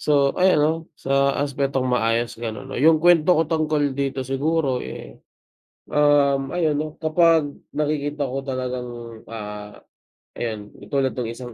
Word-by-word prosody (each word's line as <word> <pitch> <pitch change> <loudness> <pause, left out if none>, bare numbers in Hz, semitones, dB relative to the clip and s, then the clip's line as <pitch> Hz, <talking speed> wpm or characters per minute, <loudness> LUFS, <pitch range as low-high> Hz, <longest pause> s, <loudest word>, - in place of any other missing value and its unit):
So 140 -2 +3
ayun 185 -2 +3
'no, 155 - +3 0.2
sa 140 0 +1
aspetong 140 -2 -1
maayos 115 -2 0
gano'n. 120 +3 -6
O - - -4
'yung 160 +2 +6
kuwento 175 +1 +4
ko 160 - +3
tungkol 155 -3 0
dito 135 -1 -2
siguro, 135 0 0
eh, - - -9 0.7
um, 145 0 +3
ayun 155 -4 +1
'no, 155 0 -4
kapag 160 -2 +3 0.2
nakikita 150 -1 -1
ko 135 0 -3
talagang, 125 -2 -4 0.4
ah, 105 -2 -7 0.6
ayun 110 -3 -4 0.2
katulad 135 -2 -1
no'ng 120 -2 -2
isang 120 0 -9
140 Hz, 140 wpm, -22 LUFS, 125-155 Hz, 0.7 s, yung